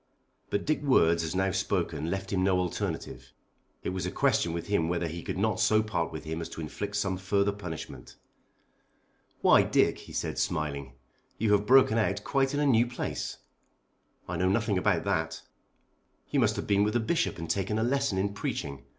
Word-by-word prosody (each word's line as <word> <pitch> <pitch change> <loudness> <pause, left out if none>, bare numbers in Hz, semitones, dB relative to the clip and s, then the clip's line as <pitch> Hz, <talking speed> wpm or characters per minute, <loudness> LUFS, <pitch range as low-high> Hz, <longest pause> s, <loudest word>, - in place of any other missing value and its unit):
But 100 - -1
Dick's 155 -1 0
words 85 - +3
as 80 +2 -3
now 95 +1 +1
spoken 85 -5 -1
left 95 +2 -3
him 95 -1 +1
no 95 -1 +3
alternative. 90 -2 -4 0.5
It - - -2
was 95 0 -3
a - - -3
question 85 - +2
with 85 0 -4
him 100 -6 +1
whether 85 0 0
he 85 +2 -6
could - - -4
not 110 +1 0
so 110 0 +4
part 95 -6 -2
with 80 - -7
him 80 +1 -4
as 80 - -5
to - - -7
inflict 100 +6 -5
some 95 -3 0
further 100 +2 +1
punishment. 90 -6 -8 1.3
"Why, - - +6
Dick," - - +2
he - - -12
said - - -3
smiling, 70 -3 -2 0.4
"you 110 0 +1
have 105 0 +3
broken 130 -3 +6
out 100 -2 0
quite 135 0 +1
in - - 0
a 145 - +2
new 120 -3 +4
place." 125 - -4 0.9
"I 90 - -3
know 90 +2 +2
nothing 105 -1 +1
about - - +1
that." - - -1 0.9
"You - - +2
must - - +3
have - - -3
been 100 0 +3
with 105 +2 0
the - - +4
Bishop 165 +9 0
and 85 - -5
taken 95 +5 -1
a 110 - +1
lesson 135 -4 +1
in 100 +1 0
preaching. 70 -8 -4
95 Hz, 195 wpm, -29 LUFS, 85-110 Hz, 1.3 s, Why